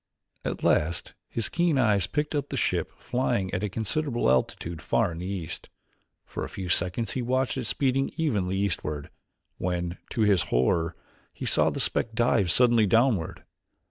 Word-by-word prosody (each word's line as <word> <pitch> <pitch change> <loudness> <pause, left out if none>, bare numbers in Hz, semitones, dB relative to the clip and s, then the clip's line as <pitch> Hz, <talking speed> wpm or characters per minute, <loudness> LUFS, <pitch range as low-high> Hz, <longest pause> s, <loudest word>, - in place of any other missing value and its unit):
At - - -4
last 80 +3 +1 0.2
his 115 - -1
keen 170 -4 +1
eyes 105 -7 +3
picked 150 +7 -2
up 145 -1 -2
the - - -3
ship - - 0
flying 120 -7 -1
at 90 - -1
a 105 - -1
considerable 120 +6 0
altitude 80 +5 -1
far 105 +3 +1
in 85 - -7
the 90 - -5
east. 90 -4 -5 0.6
For - - -5
a - - -5
few 95 -2 -6
seconds 90 +6 +3
he 130 - -2
watched 130 +2 0
it 130 -3 -3
speeding 135 +3 +1
evenly 100 - 0
eastward, 80 -7 -2 0.5
when, 90 0 -2
to 115 - -2
his 100 -5 +3
horror, 80 +7 +1 0.4
he - - -7
saw - - +4
the - - -4
speck 115 - 0
dive 115 -6 +2
suddenly 115 +2 +5
downward. 115 -5 +1
105 Hz, 170 wpm, -27 LUFS, 90-125 Hz, 0.6 s, suddenly